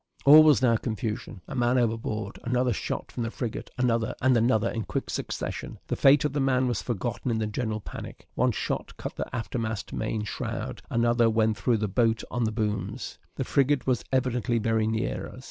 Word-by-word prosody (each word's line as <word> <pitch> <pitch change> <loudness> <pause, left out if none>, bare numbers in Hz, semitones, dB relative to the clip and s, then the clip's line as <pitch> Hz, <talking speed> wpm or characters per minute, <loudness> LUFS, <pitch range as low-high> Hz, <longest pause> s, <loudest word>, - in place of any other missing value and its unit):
All 150 +3 +10
was 150 -4 +5
now 115 -2 +5
confusion. 110 -3 -4
"A - - -6
man 120 -1 +2
overboard!" 110 -3 -1
another 125 0 +1
shot - - -4
from 125 - -4
the 115 - -1
frigate 120 0 -5
another 115 -2 +1
and 130 0 +4
another 115 -1 +3
in 115 - -2
quick - - -3
succession. - - -4
The - - 0
fate 140 +1 +5
of 150 - 0
the 145 - 0
man 130 -1 +2
was 120 -5 -1
forgotten 120 +2 -3
in 115 - +1
the 110 - 0
general 110 0 -2
panic. - - -9
One - - +2
shot - - -3
cut - - -6
the - - -4
aftermost 110 -1 -3
main 110 -1 -2
shroud; 105 - -4
another 120 0 +3
went 110 -1 +2
through 120 -3 +2
the 105 0 -1
boat 115 +2 +1
on 120 -1 0
the 110 - 0
booms. 105 -1 -3 0.2
The - - -1
frigate 140 -1 +2
was 125 -4 +1
evidently 125 -2 +1
very 110 0 +1
near 110 - -2
us. - - -11
115 Hz, 195 wpm, -27 LUFS, 110-125 Hz, 0.2 s, All